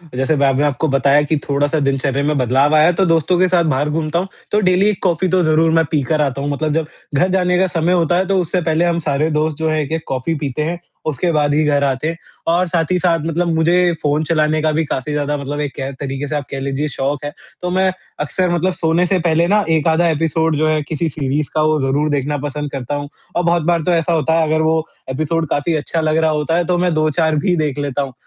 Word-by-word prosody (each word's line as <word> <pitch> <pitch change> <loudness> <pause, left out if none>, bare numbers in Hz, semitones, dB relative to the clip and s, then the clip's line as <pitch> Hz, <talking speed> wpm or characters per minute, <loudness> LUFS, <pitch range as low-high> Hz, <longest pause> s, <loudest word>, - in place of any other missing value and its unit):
जैसे 135 +4 +1
मैंने 140 0 +2
आपको 145 +2 0
बताया 140 +2 +3
कि 150 +1 0
थोड़ा-सा 145 +2 +1
दिनचर्या 135 0 0
में 150 0 0
बदलाव 135 +4 +2
आया 155 +1 +5
है, 175 - +4
तो 190 +3 +1
दोस्तों 165 +2 +2
के 185 - +4
साथ 180 -1 +2
बाहर 145 +3 0
घूमता 155 +2 -1
हूँ। 185 - -3 0.2
तो 210 - +3
डेली 185 +1 +3
1 210 - -3
कॉफ़ी 180 0 +1
तो 185 -1 +2
ज़रूर 160 +1 +3
मैं 165 -1 +3
पीकर 150 +1 +1
आता 140 -1 -1
हूँ। 145 - -2
मतलब 150 +1 -1
जब 160 -1 -1 0.3
घर 180 +7 +2
जाने 180 -1 +2
का 190 - +3
समय 175 +1 0
होता 175 0 +2
है 190 - +1
तो 195 -1 +2
उससे 175 +2 -1
पहले 165 +1 +1
हम 170 -1 +1
सारे 150 0 0
दोस्त 155 0 0
जो 160 0 -1
हैं 155 0 0
1-1 160 +2 -3
कॉफ़ी 135 +5 -2
पीते 145 0 -3
हैं। 170 +2 -3 0.3
उसके 170 +4 -1
बाद 145 -2 +1
ही 155 +1 +2
घर 145 -1 +2
आते 135 +2 0
हैं 165 +1 -3 0.3
और 175 +2 +2
साथ 165 -1 -1
ही 180 - +3
साथ 170 -2 +2
मतलब 170 +2 -1
मुझे 160 +2 +2 0.3
फ़ोन 150 +1 +1
चलाने 155 -1 +1
का 155 - +1
भी 155 +1 0
काफ़ी 140 +1 -3
ज़्यादा 145 0 -1
मतलब 145 +1 -5
एक 145 -2 -4
कह 135 0 -4
तरीके 135 +1 -4
से 150 - -3
आप 145 - -2
कह 135 - -4
लीजिए 140 +2 -2
शौक़ 140 0 -3
है। 145 - -4 0.3
तो 180 - -2
मैं 190 +1 +2 0.3
अक्सर 175 +5 -1
मतलब 175 +2 0
सोने 165 +1 +1
से 185 0 +1
पहले 165 0 +2
ना 210 +2 +3
1 160 -1 +2
आधा 165 +2 +3
एपिसोड 160 0 0
जो 155 +1 +1
है 155 -1 +1
किसी 160 +1 -2
सीरीज़ 145 0 -2
का 155 - +2
वो 155 0 +2
ज़रूर 140 +3 0
देखना 145 +1 -1
पसंद 145 0 -5
करता 135 +1 -4
हूँ 145 0 -5 0.3
और 175 - +1
बहुत 170 -1 +2
बार 170 0 +1
तो 180 - +1
ऐसा 165 +1 +1
होता 160 +1 +2
है 160 - +1
अगर 155 +1 +1
वो 160 0 +1 0.3
एपिसोड 155 +3 -1
काफ़ी 145 +3 0
अच्छा 155 +2 -2
लग 155 0 +1
रहा 160 -1 +2
होता 150 +2 0
है, 175 - +1
तो 180 +1 +1
मैं 175 -1 +1
2-4 155 0 +1
भी 175 +4 +1
देख 150 -3 -1
लेता 145 -1 -2
हूँ। 135 -2 -5
155 Hz, 255 wpm, -18 LUFS, 145-170 Hz, 0.3 s, आया